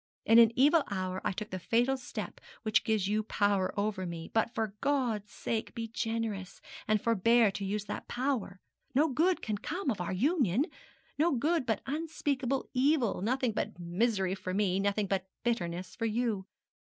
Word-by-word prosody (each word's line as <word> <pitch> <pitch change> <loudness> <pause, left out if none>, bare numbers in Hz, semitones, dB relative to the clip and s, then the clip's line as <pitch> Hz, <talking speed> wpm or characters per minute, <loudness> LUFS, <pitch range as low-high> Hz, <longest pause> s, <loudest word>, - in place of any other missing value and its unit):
In 225 +1 +7
an 230 -1 +7
evil 295 +5 +5
hour 185 -2 -2
I - - +1
took 210 +2 -6
the 185 - -3
fatal 240 +8 +2
step 255 -1 -6 0.2
which 215 -2 +3
gives 215 -4 +1
you 210 +1 +1
power 205 -3 +1
over 200 -3 -1
me. 165 -1 -6
But, 225 +1 +2
for 220 -4 -2
God's 245 -8 0
sake, 225 0 -3
be 230 -1 -3
generous, 225 -4 -3 0.3
and 215 0 +3
forbear 230 0 +4
to 200 - -5
use 205 +1 -2
that - - -5
power. 245 -7 -2 0.4
No 305 +4 +4
good 335 +7 +2
can 215 -1 -1
ever - - -29
come 340 -4 -2
of 200 - -3
our 175 - -2
union 255 - +2 0.5
no 330 +1 +4
good, 295 +2 +1
but 220 -3 0
unspeakable 280 -3 -1
evil; 260 - +2
nothing 250 +3 +1
but 205 - -3
misery 190 +2 0
for 185 -1 -4
me 195 -2 +2
nothing 200 +1 +1
but 190 -1 -1 0.2
bitterness 180 -7 -2
for 230 - -1
you. 220 -4 -1
220 Hz, 180 wpm, -31 LUFS, 195-255 Hz, 0.5 s, In